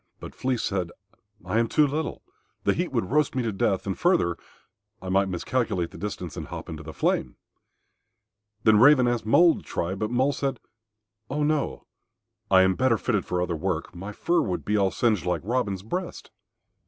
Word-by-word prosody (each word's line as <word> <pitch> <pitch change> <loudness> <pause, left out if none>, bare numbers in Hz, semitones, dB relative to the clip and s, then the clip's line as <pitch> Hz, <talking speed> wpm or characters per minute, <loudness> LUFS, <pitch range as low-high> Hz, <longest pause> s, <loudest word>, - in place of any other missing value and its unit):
But - - -9
Flea 130 -1 -1
said, 95 -5 -2 0.5
"I 100 +5 +1
am 115 - +2
too 150 - +4
little. 150 +3 -3 0.4
The - - +3
heat - - -2
would 90 - -1
roast 150 -1 +2
me 130 - 0
to 115 - -1
death; 95 -1 0
and, 95 -2 -2
further, 175 - +2 0.6
I 95 - -7
might 95 +1 +2
miscalculate 90 -1 -1
the - - -11
distance 90 -6 -5
and - - -6
hop - - -7
into 80 -1 -6
the 80 +1 -8
flame." - - -1 1.3
Then 110 -1 +5
Raven 130 0 +6
asked 120 -2 -1
Mole 170 +8 +5
to - - -9
try, 85 +2 -3
but 105 +2 -2
Mole 130 +4 +2
said, 135 -3 -2 0.7
"Oh 150 +2 -1
no, 150 -1 -1 0.6
I 95 -1 +6
am 95 0 +3
better 125 +3 +2
fitted 105 -5 -1
for 90 0 0
other 90 -1 -2
work. 90 +1 -3
My 95 +4 -7
fur 170 +10 +1
would 90 - -3
all 100 -2 +3
be - - -12
singed 110 -6 +1
like 90 - 0
Robin's 100 -4 -1
breast." 175 - -5
105 Hz, 190 wpm, -26 LUFS, 95-130 Hz, 1.3 s, Raven